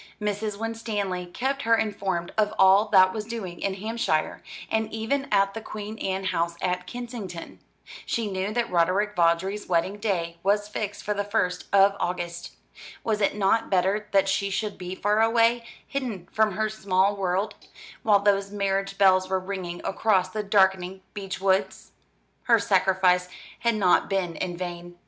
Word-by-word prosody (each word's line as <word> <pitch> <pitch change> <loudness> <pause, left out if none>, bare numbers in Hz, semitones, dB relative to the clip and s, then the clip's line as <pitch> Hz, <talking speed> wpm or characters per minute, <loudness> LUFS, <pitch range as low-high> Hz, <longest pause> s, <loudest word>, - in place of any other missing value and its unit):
Mrs. 210 0 -2
Winstanley 210 -5 -3
kept 265 +9 -2
her 230 -2 +4
informed 195 -5 -2
of 210 -1 +1
all 190 +2 +6
that 185 -2 +5
was 215 - -3
doing 210 -6 -6
in 195 -1 -1
Hampshire, 210 -6 -1 0.3
and 220 0 0
even 250 +6 -1
at 195 -1 +3
the 225 - -6
Queen 215 0 -7
Anne 190 0 -2
house 170 -2 -1
at 180 0 -2
Kensington. 230 -8 -7 0.5
She 230 -2 -1
knew 190 +2 -2
that 235 -1 -1
Roderick 185 +5 +1
Vawdrey's 175 +4 +1
wedding 185 +3 0
day 170 -6 -2
was 205 +2 +1
fixed 210 -1 -5
for 210 - -1
the 205 0 -1
first 200 -3 -1
of 200 0 +5
August. 175 -1 -4 0.5
Was 215 -2 0
it 200 - +2
not 210 +3 +1
better 195 +3 +1
that 195 -1 +3
she 200 +1 0
should 210 +1 -2
be 180 0 -6
far 210 +3 +1
away, 230 +1 +3 0.2
hidden 230 -10 -4
from 215 -2 +2
her 215 +3 0
small 200 -2 +1
world; 195 +2 -1 0.5
while 205 -2 +4
those 200 -1 +2
marriage 195 -1 -1
bells 185 -1 +4
were 190 0 +1
ringing 185 -2 -5
across 190 -3 +1
the 215 +3 -3
darkening 190 -2 +2
beech 195 -2 -5
woods? 190 0 0 0.5
Her 235 -2 +5
sacrifice 190 -3 +2 0.3
had 235 -1 +1
not 190 -4 +3
been 185 -4 -1
in 175 0 -4
vain. 175 -1 -6
195 Hz, 165 wpm, -26 LUFS, 185-215 Hz, 0.5 s, all